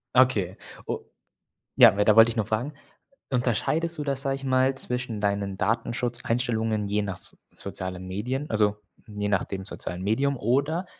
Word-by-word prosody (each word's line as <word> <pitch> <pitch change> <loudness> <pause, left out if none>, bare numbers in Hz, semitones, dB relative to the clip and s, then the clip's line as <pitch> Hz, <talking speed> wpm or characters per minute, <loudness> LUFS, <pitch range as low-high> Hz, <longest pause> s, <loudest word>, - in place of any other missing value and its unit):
Okay. 105 -8 +3 0.3
U - - -2 0.8
ja, - - +8
weiter 105 +1 +4
wollte 115 0 +8
ich 115 - -3
nur 105 - +1
fragen. 115 +7 -2 0.6
Unterscheidest 135 +7 0
du 150 - -2
das, 135 -1 -1
sage 135 -1 0
ich 135 - -12
mal, 130 0 +2
zwischen 125 -4 -4
deinen 100 -1 -1
Datenschutzeinstellungen 115 -1 0
je 105 +1 +1
nach 95 -3 -4
so - - -8 0.2
sozialen 95 0 -5
Medien, 125 +10 -3
also, 105 -1 +1 0.3
je 105 -1 -3
nach 100 -2 +2
dem 95 -1 -6
sozialen 90 -3 -5
Medium? 135 +8 +1
Oder 140 - 0
115 Hz, 160 wpm, -26 LUFS, 105-130 Hz, 0.8 s, ja